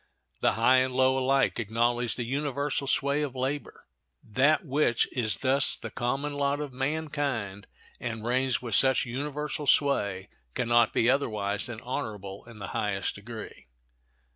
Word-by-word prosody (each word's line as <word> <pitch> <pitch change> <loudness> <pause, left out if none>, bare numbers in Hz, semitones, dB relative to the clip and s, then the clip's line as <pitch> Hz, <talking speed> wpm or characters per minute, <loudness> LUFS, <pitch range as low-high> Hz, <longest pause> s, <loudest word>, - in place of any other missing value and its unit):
The - - +2
high 115 +5 +4
and 130 0 +1
low 130 0 +4
alike 135 0 +2
acknowledge 120 +1 0
the 120 - -3
universal 140 +1 -2
sway 140 +2 +2
of 140 -3 -3
labor. 135 +3 -4 0.4
That 140 - +2
which 135 -4 +2
is 115 -4 +1
thus 135 +1 +2
the - - -8
common 135 +4 -2
lot 140 0 0
of 145 -3 -5
mankind 135 -8 -2 0.3
and 115 -2 -5
reigns 130 +1 +1
with 115 -3 -4
such 130 +5 +4
universal 145 +3 -4
sway 100 -10 +2 0.3
can 125 - -1
not 120 -1 +4
be 115 - +2
otherwise 105 -6 +1
than 120 -2 -7
honorable 105 -7 -5
in 115 -2 -13
the 100 -2 -6
highest 100 -2 -1
degree. 110 - -9
130 Hz, 150 wpm, -28 LUFS, 115-140 Hz, 0.4 s, high